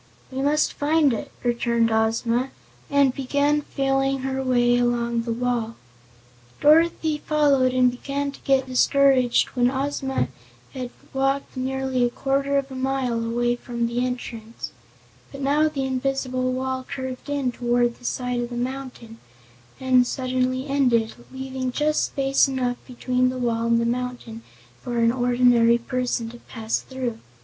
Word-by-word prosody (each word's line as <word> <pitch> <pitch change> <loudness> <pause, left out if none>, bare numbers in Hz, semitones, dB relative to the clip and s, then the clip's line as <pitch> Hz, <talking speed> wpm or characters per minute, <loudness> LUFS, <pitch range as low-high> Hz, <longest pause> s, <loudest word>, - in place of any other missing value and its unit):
"We 260 +1 -3
must 295 +2 +2
find 295 -2 +2
it," 225 - -5
returned 235 -1 +1
Ozma, 230 +3 +1 0.4
and 280 -2 +3
began 285 +3 +1
feeling 270 -1 0
her 265 0 -2
way 245 -2 +3
along 235 -1 +1
the 230 0 -4
wall. 235 -1 -1 0.8
Dorothy 315 0 +4
followed 285 -5 +3
and 250 -1 +3
began 280 +3 -3
to - - -14
get 270 -1 +2
discouraged 260 -1 +3
when 245 -1 +2
Ozma 270 0 -1 0.4
had 255 -2 -5 0.2
walked 270 +1 0
nearly 260 0 -1
a 240 - +3
quarter 275 +2 0
of 275 -1 -2
a - - -6
mile 260 -3 -1
away 240 +1 0
from 240 -1 -3
the 235 +1 -1
entrance. 235 -2 -5 0.6
But 275 - -8
now 295 +3 +3
the 275 -3 -3
invisible 255 -1 -1
wall 260 0 -2
curved 260 0 -6
in 280 -3 0
toward 240 0 0
the - - -20
side 250 0 -2
of 240 0 -3
the 245 - -6
mountain 250 -3 -5 0.6
and 255 -1 +3
suddenly 255 0 -1
ended, 250 -6 +2 0.2
leaving 260 -1 -4
just 300 +3 +1
space 275 0 +2
enough 255 -2 -1
between 255 0 0
the 255 - -4
wall 230 -2 0
and 235 0 +3
the 235 - 0
mountain 240 -1 -3 0.4
for 240 -1 -4
an 230 0 +4
ordinary 245 -1 +4
person 245 -1 -2
to 240 - -11
pass 225 -2 -3
through. 255 -4 -5
255 Hz, 150 wpm, -24 LUFS, 240-270 Hz, 0.8 s, Dorothy